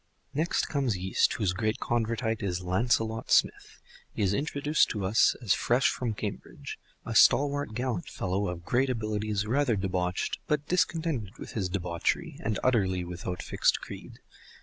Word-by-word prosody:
Next 155 +4 +1
comes 135 - 0
Yeast, 95 +1 +2
whose 100 -6 0
great 110 +2 -1
Convertite 115 -1 -1
is 90 -2 -2
Lancelot 110 +4 0
Smith. - - +2 0.3
He - - -2
is 95 0 +2
introduced 145 +4 +1
to 105 -3 -3
us 100 +4 +4
as 105 - +3
fresh 125 +3 +2
from 115 -4 -3
Cambridge, 105 -1 -6 0.3
a - - -4
stalwart 145 -4 +4
gallant 120 -6 -2
fellow 95 +2 -2
of 85 -1 -5
great 130 +2 +2
abilities, 110 -3 -1
rather 125 +1 +2
debauched, 90 -2 -1
but 150 -2 0
discontented 160 - -1
with - - -8
his 95 -5 -2
debauchery, 90 -3 -2
and 110 -2 0
utterly 95 -8 +2
without 90 +1 -5
fixed - - +2
creed. - - -10
110 Hz, 150 wpm, -28 LUFS, 95-130 Hz, 0.3 s, us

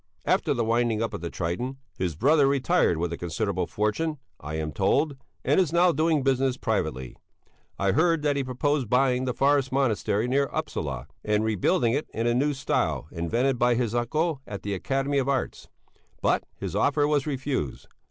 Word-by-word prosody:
After - - +2
the 115 - 0
winding 115 -1 +1
up 115 - -3
of - - -5
the 85 - -4
"Triton," 105 +13 -3 0.2
his 90 -4 -2
brother 140 - +4
retired 140 - +2
with 85 +1 -2
a - - -4
considerable 90 +2 -2
fortune, 150 +10 -1 0.2
I 75 +2 -6
am 80 -1 -3
told, 140 - +1 0.3
and - - +3
is 180 -5 +2
now 175 +1 +4
doing 155 -1 +1
business 135 -1 +1
privately. 80 - -2 0.6
I 100 0 +1
heard 165 - +2
that 145 -1 +2
he 140 - 0
proposed 130 0 -1
buying 125 0 +2
the 125 - -1
forest 135 0 +2
monastery 115 -4 +1
near 140 +2 +1
Upsala, 70 - -3 0.2
and 105 0 +1
rebuilding 110 +2 +1
it 145 +3 -1
in 115 - -1
a 120 - +3
new 140 +4 +1
style 130 - -1
invented 115 +10 0
by 120 0 +3
his 120 -2 -1
uncle 140 +5 0
of 100 - -7
the 100 - -2
Academy 135 +8 0
of 135 0 -1
Arts. 135 -2 -2 0.5
But - - +1
his - - -5
offer 145 0 +2
was 150 -1 +1
refused. 135 - -3
125 Hz, 180 wpm, -26 LUFS, 105-140 Hz, 0.6 s, brother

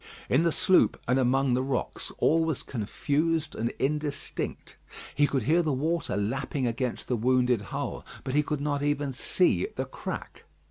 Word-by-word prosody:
In 130 - +4
the 170 0 +3
sloop 185 +3 +3
and 125 +2 +3
among 130 +1 +3
the 125 - +2
rocks 130 -2 -3
all 165 +1 +3
was 160 -4 -1
confused 145 +7 -1
and 115 +1 -1
indistinct. 145 +1 -3 0.4
He 145 0 +3
could 135 -5 0
hear 160 +8 +4
the 155 -3 0
water 160 0 -1
lapping 130 +6 -1
against 120 +1 -2
the 125 - +1
wounded 125 0 +2
hull, - - -4 0.2
but 130 - -3
he 150 - +4
could 150 -1 -3
not 145 -1 -1
even 145 -1 0
see 125 - +2
the - - -2
crack. - - -7
140 Hz, 170 wpm, -28 LUFS, 125-150 Hz, 0.4 s, In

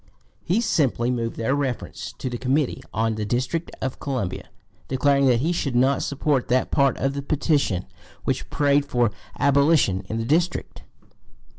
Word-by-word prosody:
He 195 +7 +1
simply 130 - +1
moved 115 -2 -2
their 115 +4 0
reference 140 -4 -3
to - - -4
the 120 -1 -4
Committee 135 +2 0
on 110 0 0
the 110 0 -3
District 130 +10 -1
of 130 -1 -3
Columbia, 125 -10 -3 0.4
declaring 140 +1 +3
that 120 -2 +3
he 160 +5 +1
should 140 -7 -1
not 130 +3 +3
support 140 -2 0
that 130 +1 +1
part 140 -1 +3
of 135 +1 0
the 140 - -3
petition 140 - 0 0.4
which - - -2
prayed 145 0 +3
for 120 -5 +1 0.3
abolition 140 - +3
in 110 - -2
the 115 - -2
District. 170 +7 0
135 Hz, 160 wpm, -24 LUFS, 120-145 Hz, 0.4 s, declaring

